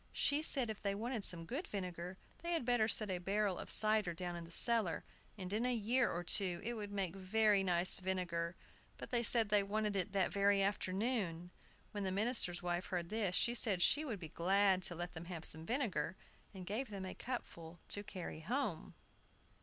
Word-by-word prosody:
She 285 +1 +2
said 265 -7 +4
if 215 - -9
they 200 -1 -1
wanted 230 +1 -3
some 170 -3 +2
good 275 - -4
vinegar 180 -2 -5 0.2
they 345 0 -2
had 325 -7 -1
better 240 -3 +2
set 215 -3 +3
a 180 - -2
barrel 195 +1 -1
of - - -7
cider 215 -5 +4
down 175 0 -4
in 170 -1 -7
the 165 - -14
cellar, 220 -3 +2 0.3
and 185 -1 -6
in 220 +3 0
a 250 0 +1
year 235 +3 +1
or 175 - -3
two 180 -1 +3
it 235 - -3
would 210 -3 -6
make 195 -3 -2
very 200 +1 +2
nice 180 -1 +2
vinegar. 180 -2 -2 0.4
But - - -9
they 240 -2 +2
said 230 -2 +5
they 205 -1 +4
wanted 210 +1 -2
it 195 +1 -1
that 195 -2 +1
very 200 0 +3
afternoon. 195 -3 -1 0.4
When 205 -2 -4
the 190 - -1
minister's 200 -4 +1
wife 175 +1 -2
heard 175 -3 -3
this, 210 -4 0
she 240 - +3
said 210 -7 +5
she 295 - +5
should 245 -10 -4
be 170 - -7
very - - -26
glad 190 +2 +3
to 175 - 0
let 175 +1 -5
them 165 0 -7
have 170 -2 -7
some 160 +1 -6
vinegar, 240 -7 -1 0.4
and 185 -2 -9
gave 220 +7 -3
them 195 -2 -6
a 185 - -6
cupful 170 -9 -7
to 205 - -1
carry 185 -5 -7
home. 215 - -3
195 Hz, 210 wpm, -36 LUFS, 180-220 Hz, 0.4 s, said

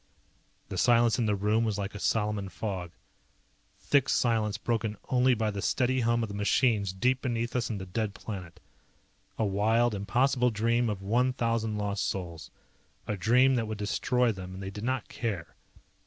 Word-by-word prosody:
The - - -3
silence 120 0 +4
in 115 - +1
the 105 - +2
room 105 +3 +1
was 110 -3 -1
like 100 -1 -4
a 105 - -7
Salaman 105 -2 0
fog. 95 -4 -4 0.9
Thick 140 -3 +2
silence 110 -3 +1
broken 110 -3 -2
only 125 0 +4
by 110 -1 0
the 100 -1 -4
steady 130 +4 +1
hum 120 0 +1
of 110 - -3
the - - -6
machines 105 0 +2
deep 125 +7 +1
beneath 120 -1 -2
us 120 -2 0
in 110 - -2
the 95 - -6
dead 100 +2 -3
planet. 90 -4 -7 0.8
A 110 - +1
wild, 110 +4 +2
impossible 125 +5 +2
dream 115 +2 +1
of 100 -2 -4
one 125 +6 +2
thousand 115 -3 -1
lost 100 -1 -1
souls. 85 -4 -5 0.6
A 105 - -2
dream 125 +7 +4
that 115 -3 0
would 110 -1 -4
destroy 120 +4 +1
them, 95 -2 -7
and 95 - -7
they 95 - -5
did 105 +2 -7
not 130 -2 -1
care. 100 -8 -4
110 Hz, 180 wpm, -29 LUFS, 100-120 Hz, 0.9 s, silence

